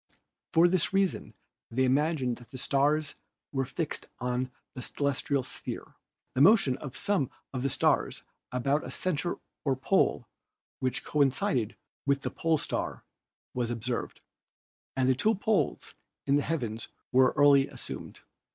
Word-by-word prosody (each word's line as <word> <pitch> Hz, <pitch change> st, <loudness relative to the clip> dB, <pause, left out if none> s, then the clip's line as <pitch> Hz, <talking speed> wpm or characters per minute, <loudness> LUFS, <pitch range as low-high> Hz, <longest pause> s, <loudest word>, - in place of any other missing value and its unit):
For 165 Hz, +2 st, +6 dB
this 180 Hz, +1 st, +2 dB
reason 195 Hz, -1 st, 0 dB, 0.3 s
they 130 Hz, +3 st, +1 dB
imagined 130 Hz, -1 st, +2 dB
that 120 Hz, -, -15 dB
the 130 Hz, -, -8 dB
stars 145 Hz, +3 st, +2 dB, 0.4 s
were 135 Hz, -1 st, 0 dB
fixed 150 Hz, +4 st, -3 dB
on 125 Hz, +1 st, -1 dB, 0.2 s
the 125 Hz, -, -6 dB
celestial 140 Hz, +1 st, 0 dB
sphere. -, -, -7 dB, 0.4 s
The 130 Hz, -, +1 dB
motion 165 Hz, -, +6 dB
of 130 Hz, -3 st, -7 dB
some 200 Hz, -, +1 dB, 0.2 s
of 130 Hz, -, -2 dB
the 135 Hz, -, +1 dB
stars -, -, +1 dB, 0.3 s
about 135 Hz, +4 st, +1 dB
a -, -, -6 dB
center 175 Hz, -1 st, -1 dB, 0.3 s
or 135 Hz, -3 st, +2 dB
pole 130 Hz, -, +2 dB, 0.5 s
which 130 Hz, -1 st, -1 dB
coincided 135 Hz, -, +1 dB, 0.3 s
with 140 Hz, 0 st, +3 dB
the -, -, -3 dB
Pole 165 Hz, -1 st, +1 dB
Star -, -, -3 dB, 0.5 s
was 120 Hz, -2 st, -1 dB
observed, 120 Hz, +1 st, -3 dB, 0.8 s
and 130 Hz, -1 st, +3 dB
the 130 Hz, -, +5 dB
two 210 Hz, -, +2 dB
poles 210 Hz, +1 st, 0 dB, 0.3 s
in 140 Hz, -, +3 dB
the 145 Hz, -, +3 dB
heavens 120 Hz, -9 st, -2 dB, 0.2 s
were 130 Hz, 0 st, +5 dB
early 140 Hz, -1 st, +6 dB
assumed. -, -, -8 dB
140 Hz, 140 wpm, -29 LUFS, 125-155 Hz, 0.8 s, For